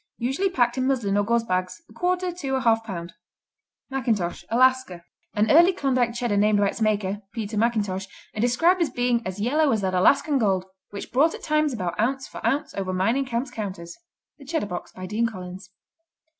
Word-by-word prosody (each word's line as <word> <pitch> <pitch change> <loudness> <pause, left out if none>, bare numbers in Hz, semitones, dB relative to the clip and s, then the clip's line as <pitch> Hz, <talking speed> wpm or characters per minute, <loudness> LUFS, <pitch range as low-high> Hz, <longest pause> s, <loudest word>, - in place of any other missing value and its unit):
Usually 270 +11 0
packed 245 -6 +1
in 255 - +1
muslin 235 -8 0
or 205 - +3
gauze 235 +2 +1
bags, 185 - -2
a - - -18
quarter 360 0 0
to 285 -7 -3
a 260 - 0
half 225 -2 +3
pound. 175 -5 -6 0.8
McIntosh 220 -11 -1
Alaska 255 -7 +2 0.3
An 210 +1 +2
early 345 +5 +7
Klondike 255 -7 0
Cheddar 240 -4 0
named 210 +1 +3
by 200 -1 +3
its 230 - -7
maker, 205 -2 0
Peter 220 -1 -4
McIntosh, 205 -4 0 0.3
and 215 - -3
described 330 +10 +3
as 335 - +2
being 245 -1 0
as 185 +2 -5
yellow 285 +7 +2
as 220 - +1
that 190 -1 -1
"Alaskan 275 +9 +3
gold, 190 -5 +1 0.2
which 200 - -8
brought 295 +6 +3
at - - -12
times 305 -1 +1
about 185 -8 -4
ounce 265 +4 0
for - - -10
ounce 270 +6 0
over 190 -1 -3
mining 230 +9 +1
camp 245 +1 -3
counters." 190 -7 -6 0.4
The 280 - -13
Cheddar 315 -3 -1
Box 180 -3 -6
by 185 - -8
Dean 215 +5 0
Collins. 185 -2 -9
230 Hz, 195 wpm, -24 LUFS, 200-270 Hz, 0.8 s, early